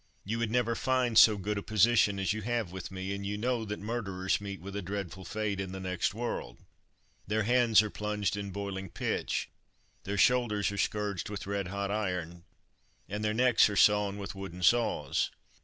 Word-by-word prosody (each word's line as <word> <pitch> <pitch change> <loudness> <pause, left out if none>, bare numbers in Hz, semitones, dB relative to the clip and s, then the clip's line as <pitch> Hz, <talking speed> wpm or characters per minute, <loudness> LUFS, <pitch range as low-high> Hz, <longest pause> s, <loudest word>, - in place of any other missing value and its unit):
You 115 +4 -2
would 115 -2 0
never 120 0 +1
find 125 -1 0
so 110 -1 +8
good 100 +1 -2
a - - -6
position 105 0 +3
as 95 +2 0
you 110 - -4
have 115 -4 -2
with 95 -2 -6
me, 95 +1 -4
and 100 0 -5
you 100 +1 -3
know 120 +1 0
that 105 0 -4
murderers 100 -4 -2
meet 100 -1 -6
with 100 +2 -8
a 100 - -2
dreadful 100 0 -5
fate 105 +1 -2
in 95 -1 -4
the 95 - -5
next 95 +1 -1
world. 115 - -4 0.7
Their 110 +2 +1
hands 115 -2 +5
are 105 - -4
plunged 105 -2 -2
in 100 -1 -4
boiling 95 -1 -5
pitch, - - -2 0.5
their 100 +1 -3
shoulders 105 -2 +3
are 100 - -5
scourged 105 -2 -1
with 105 -2 -5
red 100 -1 -2
hot 100 +1 -3
iron, 90 -5 -3 0.6
and 105 +1 -4
their 105 0 0
necks 125 -2 +5
are 105 - -3
sawn 105 -1 +4
with 100 0 -6
wooden 95 -2 -7
saws." 100 - +2
100 Hz, 190 wpm, -30 LUFS, 95-110 Hz, 0.7 s, so